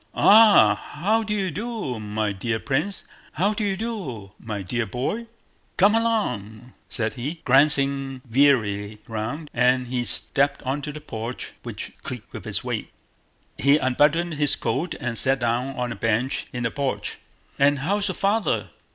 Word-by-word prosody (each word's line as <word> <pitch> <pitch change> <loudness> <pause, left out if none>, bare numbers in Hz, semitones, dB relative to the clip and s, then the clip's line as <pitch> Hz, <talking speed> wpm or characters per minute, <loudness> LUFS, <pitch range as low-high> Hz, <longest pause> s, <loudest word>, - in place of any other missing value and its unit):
"Ah, 215 0 +7
how 205 +9 -1
do 215 - -5
you 195 -4 0
do, 210 - -4
my 105 0 -2
dear 110 +4 -2
prince? 150 - -1 0.3
How 200 +6 +1
do 215 0 -2
you 195 -2 0
do, 175 - -5
my 105 -4 -5
dear 120 +4 -2
boy? 140 - -3 0.5
Come 200 +3 +5
along..." 125 - -1 0.2
said 110 -1 -1
he, 145 +6 -5
glancing 135 -1 +3
wearily 110 -6 +2
round, 115 +8 -4
and 125 +1 +3
he 125 0 -2
stepped 135 +8 +1
onto 145 +3 -3
the 150 +1 -9
porch 115 -3 -6
which - - -7
creaked - - -8
under - - -7
his - - -2
weight. - - -3 0.7
He 140 +2 +5
unbuttoned 150 +5 +2
his 145 -1 +2
coat 175 - -2
and 120 -2 -1
sat 135 0 +4
down 125 +2 -1
on 125 -1 -2
a - - -4
bench 115 +4 -1
in 125 -2 -4
the 115 - 0
porch. 140 -2 -3 0.4
"And 140 +1 +4
how's 200 +9 0
your 185 - -2
father?" 205 +3 0
135 Hz, 160 wpm, -24 LUFS, 120-175 Hz, 0.7 s, Ah